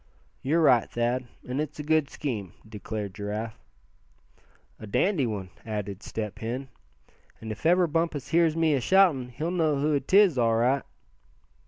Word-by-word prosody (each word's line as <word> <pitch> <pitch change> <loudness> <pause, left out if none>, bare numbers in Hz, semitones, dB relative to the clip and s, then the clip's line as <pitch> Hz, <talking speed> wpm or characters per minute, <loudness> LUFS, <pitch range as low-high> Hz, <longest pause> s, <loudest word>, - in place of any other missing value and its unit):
"You're 160 +5 +2
right, 125 -6 +4
Thad, 120 +1 -1 0.2
and 130 +4 -1
it's 150 -1 -5
a 150 - -5
good 155 -1 +2
scheme," 105 - -4
declared 105 -2 -5
Giraffe. 105 +2 -5 1.2
"A 110 - -9
dandy 150 - +1
one," 100 -5 -5
added 105 -2 -5
Step 105 -2 -5
Hen. 125 +4 -4 0.7
"And 110 -1 -6
if 110 +9 -2
ever 180 +1 +5
Bumpus 165 -3 -1
hears 165 -1 +3
me 165 -2 +2
ashoutin' 145 -2 +3
he'll 155 +8 -3
know 160 -4 +1
who 145 0 +2
'tis, 185 0 +4
all 115 -1 +3
right." 125 +4 +2
130 Hz, 150 wpm, -27 LUFS, 110-155 Hz, 1.2 s, ever